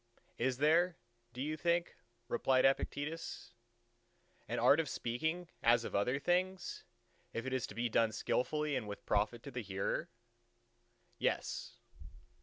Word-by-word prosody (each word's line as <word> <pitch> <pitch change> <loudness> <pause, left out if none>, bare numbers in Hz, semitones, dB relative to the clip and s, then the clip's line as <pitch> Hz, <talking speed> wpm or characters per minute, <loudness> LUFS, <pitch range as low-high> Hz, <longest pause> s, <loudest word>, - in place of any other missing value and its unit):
"Is 125 +1 +1
there, 165 +5 +4 0.3
do 125 +3 -4
you 155 +2 -1
think," 170 +2 +1 0.3
replied 130 -1 +3
Epictetus, 145 +4 -1 0.9
"an - - -2
art 145 - +6
of 160 -4 0
speaking 160 +12 -2
as 120 0 +5
of - - -5
other 125 +7 +2
things, 180 +5 0 0.5
if 115 - -3
it 130 - -2
is 130 -2 0
to - - -10
be 120 +1 0
done 115 -1 +3
skilfully 150 +7 0
and 120 -5 -2
with 100 - -7
profit 105 +3 +1
to 140 - -7
the 125 - -3
hearer?" 95 -2 -2 1.1
"Yes." - - -1
130 Hz, 140 wpm, -35 LUFS, 115-160 Hz, 1.1 s, art